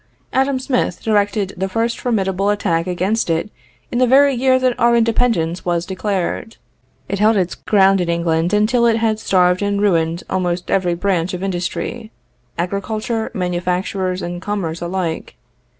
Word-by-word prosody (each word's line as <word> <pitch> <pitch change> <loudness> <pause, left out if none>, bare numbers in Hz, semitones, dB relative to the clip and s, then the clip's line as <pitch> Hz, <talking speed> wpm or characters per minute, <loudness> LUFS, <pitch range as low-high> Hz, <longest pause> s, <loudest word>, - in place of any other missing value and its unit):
Adam 265 +1 +2
Smith 255 -1 -1
directed 205 -2 +1
the 190 +1 -2
first 230 +4 -1
formidable 195 -4 0
attack 185 -5 0
against 185 +4 0
it 165 +6 -1 0.4
in 240 - 0
the 255 - +4
very 275 +2 +5
year 260 +1 +3
that 255 -1 +2
our 235 0 +4
independence 225 -7 +1
was 175 -1 -1
declared. 195 +3 -3 0.5
It 200 - -3
held 215 +1 +4
its 185 -2 0
ground 195 -2 +3
in 175 - -2
England 170 0 0
until 235 +3 +3
it 225 -1 +3
had 220 -1 0
starved 180 -3 +2
and 200 0 0
ruined 170 -4 +1
almost 180 -1 -2
every 180 -3 +1
branch 180 -1 -1
of 180 - -6
industry 195 +5 -3 0.5
agriculture, 215 +5 -2
manufactures, 180 +1 -2
and 175 0 -5
commerce 185 -5 -3
alike. 175 -2 -3
195 Hz, 150 wpm, -19 LUFS, 175-225 Hz, 0.5 s, very